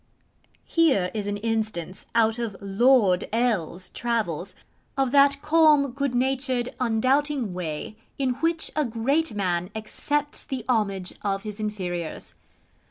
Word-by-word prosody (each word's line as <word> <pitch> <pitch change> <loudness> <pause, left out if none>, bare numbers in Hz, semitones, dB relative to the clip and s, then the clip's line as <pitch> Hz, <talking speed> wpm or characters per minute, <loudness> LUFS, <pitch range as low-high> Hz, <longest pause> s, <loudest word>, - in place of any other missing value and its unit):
Here 270 - +2
is 210 -2 -3
an 205 0 -2
instance, 215 -5 -3
out 225 0 +3
of 220 -5 -3
Lord 200 -1 +3
L 220 -8 0
's 180 -1 -7
travels, 200 -6 -2 0.4
of 270 -2 +1
that 280 0 +4
calm, 300 -3 +5
good 275 -1 -2
natured, 255 -1 0
undoubting 255 0 +1
way 175 +3 -5 0.2
in 265 -2 +1
which 330 0 +1
a 305 - +2
great 245 +3 0
man 180 -3 -1
accepts 290 +7 -2
the 260 -5 -5
homage 200 -6 0
of 195 -1 -2
his 210 -1 -6
inferiors. 180 -6 -4
225 Hz, 130 wpm, -25 LUFS, 195-270 Hz, 0.4 s, calm